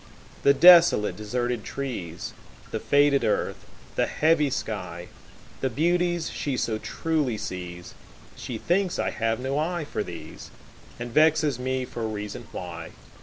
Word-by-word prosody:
The 140 0 +5
desolate, 170 -9 +7
deserted 120 +2 -2
trees, 105 -12 -5 0.4
The - - -2
faded 145 -2 +3
earth, 110 - -1 0.3
the - - +2
heavy 155 -2 +2
sky, 90 -9 -4 0.5
The 130 - 0
beauties 175 +5 +1
she 140 -3 -2
so 110 -3 -1
truly 150 -7 -1
sees, 90 -3 -6 0.4
She 120 - -5
thinks 185 - 0
I - - 0
have 115 +1 -1
no 135 +3 -1
eye 170 0 -1
for 145 - -3
these, 85 -4 -9 0.5
And 120 0 -5
vexes 155 -3 +3
me 130 0 -1
for 115 -2 -4
reason 105 -1 -6
why. 85 -2 -7
125 Hz, 135 wpm, -26 LUFS, 105-155 Hz, 0.5 s, desolate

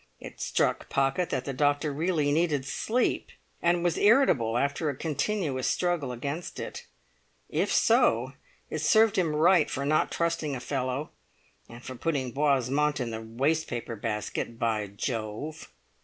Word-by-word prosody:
It - - -10
struck - - 0
Pocket 135 +6 +1
that 130 - -2
the 135 - -3
doctor 145 +2 +1
really 155 -1 +1
needed 150 -3 +1
sleep, 235 - 0 0.3
and 175 0 +2
was 175 -3 +1
irritable 200 - +4
after 140 +4 0
a 140 - -3
continuous 150 -2 -1
struggle 175 -7 0
against 140 +7 -5
it. - - -7 0.6
If - - 0
so, 120 +4 +3 0.4
it 155 - -2
served 215 +7 +4
him 165 -5 +1
right 165 +1 +4
for 140 0 -3
not 155 +2 +2
trusting 165 -4 -1
a - - -4
fellow—and 130 -2 -6
for 130 - -6
putting 130 -1 -2
Boismont 140 +1 +1
in 120 -2 -2
the 110 0 -5
waste 135 +9 0
paper 120 -1 -4
basket, 110 +2 -3
by 110 -3 0
Jove! 115 +8 -5
145 Hz, 145 wpm, -28 LUFS, 125-160 Hz, 0.6 s, irritable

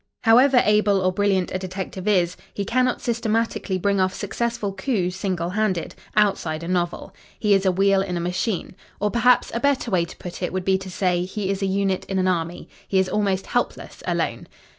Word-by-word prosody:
However 245 +3 +6
able 210 -1 +3
or 185 0 +2
brilliant 190 -1 +1
a 185 - -1
detective 185 +1 -6
is, 180 -4 +2 0.2
he 200 - -2
cannot 250 +3 +1
systematically 225 -4 -1
bring 200 +2 +1
off 185 0 +1
successful 215 0 -2
coups 190 -3 -1
single 180 -3 -2
handed 190 -4 -1 0.2
outside 175 -6 +1
a - - -5
novel. 175 -1 -2 0.3
He 210 -2 +3
is 195 -1 +3
a - - +5
wheel 195 +1 +3
in 180 -2 -2
a - - -1
machine. 180 +2 -2 0.2
Or 210 0 0
perhaps, 245 +1 +3
a 235 - -1
better 270 -3 +1
way 175 -3 +2
to - - -12
put 180 0 -8
it 180 - -1
would 185 -1 -3
be 190 0 +3
to 190 0 -8
say, 180 -1 0
he 195 0 -3
is 195 0 -3
a 195 - +1
unit 195 -1 0
in 195 - -3
an 185 0 +2
army. 170 -1 -2 0.2
He 195 - 0
is 190 0 +2
almost 195 -2 0
helpless 245 - -3
alone. - - -1
195 Hz, 205 wpm, -23 LUFS, 185-210 Hz, 0.3 s, However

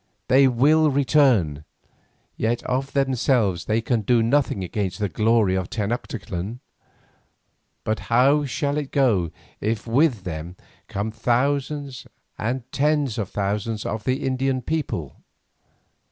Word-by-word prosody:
They 135 +1 +6
will 150 +6 +4
return, 130 - +3 0.7
yet 115 +2 -1
of 135 +2 -2
themselves 130 -8 +1
they 110 +1 +1
can 115 0 0
do 115 +2 +3
nothing 120 -5 +1
against 95 -1 -3
the 105 - -1
glory 105 +1 +2
of 95 -2 -2
Tenoctitlan. 105 -1 -4 1.2
But 110 0 -1
how 135 +5 +4
shall 140 +2 -1
it 145 -2 -5
go 110 - +2 0.3
if 110 0 -2
with 120 - +2
them 85 0 -6 0.3
come 100 +2 -3
thousands 135 +4 -1 0.3
and 120 +3 -2
tens 145 -5 +1
of 100 - -3
thousands 105 +2 -2
of 105 0 -3
the 130 +3 0
Indian 130 0 0
peoples? 135 - -3
120 Hz, 125 wpm, -23 LUFS, 105-135 Hz, 1.2 s, They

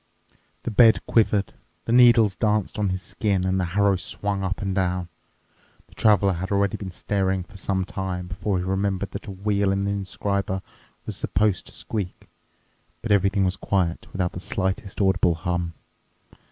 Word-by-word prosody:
The - - -3
bed 110 +1 +5
quivered, 105 -3 +2 0.3
the - - -2
needles 120 -4 +6
danced 105 -1 0
on 100 -2 +1
his 95 0 -3
skin, 100 -3 -1
and 95 0 +1
the 90 - +1
harrow 100 -1 +4
swung 100 +1 -3
up 95 0 -2
and 95 -1 -2
down. 90 -2 -1 0.8
The - - -21
Traveler 100 -3 +3
had 95 +3 -4
already 100 -1 +2
been 100 - -6
staring 95 0 -1
for 90 - -18
some 95 0 -1
time 95 -1 -4
before 95 +2 -2
he 90 - -1
remembered 95 +1 -1
that - - -7
a - - -5
wheel 100 0 0
in 100 0 0
the 100 - 0
inscriber 100 -1 -2 0.4
was - - -5
supposed 100 0 0
to - - -10
squeak. 100 -5 -5 0.8
But 115 - -2
everything 100 0 +3
was 90 0 0
quiet, 90 -4 -1
without 90 -2 -1
the - - -7
slightest 95 +1 -2
audible 95 -3 +3
hum. 85 0 -2
95 Hz, 170 wpm, -24 LUFS, 95-100 Hz, 0.8 s, needles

